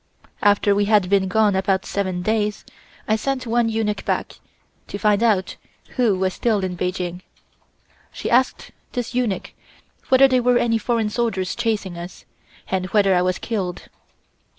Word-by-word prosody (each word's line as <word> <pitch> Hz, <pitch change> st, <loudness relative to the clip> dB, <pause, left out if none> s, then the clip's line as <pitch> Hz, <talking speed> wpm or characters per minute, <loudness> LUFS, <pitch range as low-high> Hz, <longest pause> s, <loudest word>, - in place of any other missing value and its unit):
"After 205 Hz, 0 st, +4 dB
we 205 Hz, 0 st, +2 dB
had 205 Hz, -3 st, +2 dB
been 195 Hz, -1 st, +3 dB
gone 210 Hz, +1 st, +2 dB
about 190 Hz, 0 st, 0 dB
seven 185 Hz, -3 st, -2 dB
days, 210 Hz, 0 st, -1 dB, 0.4 s
I 215 Hz, -, +3 dB
sent 255 Hz, +3 st, -2 dB
one 235 Hz, 0 st, +1 dB
eunuch 220 Hz, -2 st, -1 dB
back, -, -, -3 dB, 0.5 s
to -, -, -5 dB
find 210 Hz, 0 st, +2 dB
out 210 Hz, -5 st, +1 dB, 0.3 s
who 230 Hz, -7 st, +1 dB
was 185 Hz, 0 st, 0 dB
still 215 Hz, -5 st, 0 dB
in 185 Hz, -1 st, -2 dB
Peking. 180 Hz, 0 st, -3 dB, 0.9 s
She -, -, -6 dB
asked 255 Hz, +2 st, +1 dB, 0.2 s
this 245 Hz, -1 st, -3 dB
eunuch 240 Hz, -6 st, -1 dB, 0.6 s
whether 265 Hz, +1 st, +7 dB
there 255 Hz, -1 st, +2 dB
were 245 Hz, 0 st, +3 dB
any 230 Hz, -2 st, +1 dB
foreign 225 Hz, -2 st, 0 dB
soldiers 210 Hz, -6 st, -1 dB
chasing 210 Hz, -7 st, -2 dB
us, 175 Hz, +1 st, -10 dB, 0.4 s
and 185 Hz, -1 st, -1 dB
whether 195 Hz, 0 st, +3 dB
I 180 Hz, -, +3 dB
was 180 Hz, 0 st, 0 dB
killed. 190 Hz, -6 st, -4 dB
205 Hz, 155 wpm, -21 LUFS, 190-230 Hz, 0.9 s, whether